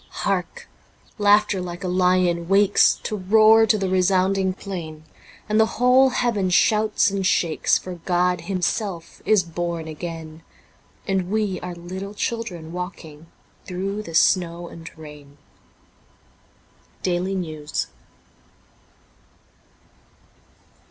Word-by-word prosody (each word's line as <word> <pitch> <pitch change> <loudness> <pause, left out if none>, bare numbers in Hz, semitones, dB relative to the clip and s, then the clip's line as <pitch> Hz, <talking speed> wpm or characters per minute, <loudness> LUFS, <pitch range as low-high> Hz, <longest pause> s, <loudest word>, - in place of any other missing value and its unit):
Hark! - - -2 0.5
Laughter 205 -1 +3
like 175 +1 -7
a - - -2
lion 180 -2 +1
wakes 200 +1 +4
To 215 - -3
roar 220 +3 +5
to 215 - +3
the 195 -2 -1
resounding 190 +1 +2
plain, 170 -5 -7 0.4
And 215 0 +1
the 220 - +5
whole 250 +3 +5
heaven 230 -6 0
shouts 215 +3 +3
and 195 -1 -2
shakes. 170 -4 +2
For 185 - -7
God 180 0 0
Himself 185 0 -3
is 215 -4 +4
born 170 -1 -4
again; 160 0 -7 0.7
And 190 -2 -1
we 210 -3 -1
are 180 -1 -7
little 190 +4 -7
children 200 -8 -4
walking 165 -3 -8 0.4
Through 195 +3 -3
the 165 -6 -8
snow 170 0 +2
and 165 0 -10
rain. 150 -2 -13 0.9
' - - -35
Daily 185 +1 -1
Nezvs.'' 155 -5 -4
185 Hz, 110 wpm, -22 LUFS, 170-205 Hz, 0.9 s, roar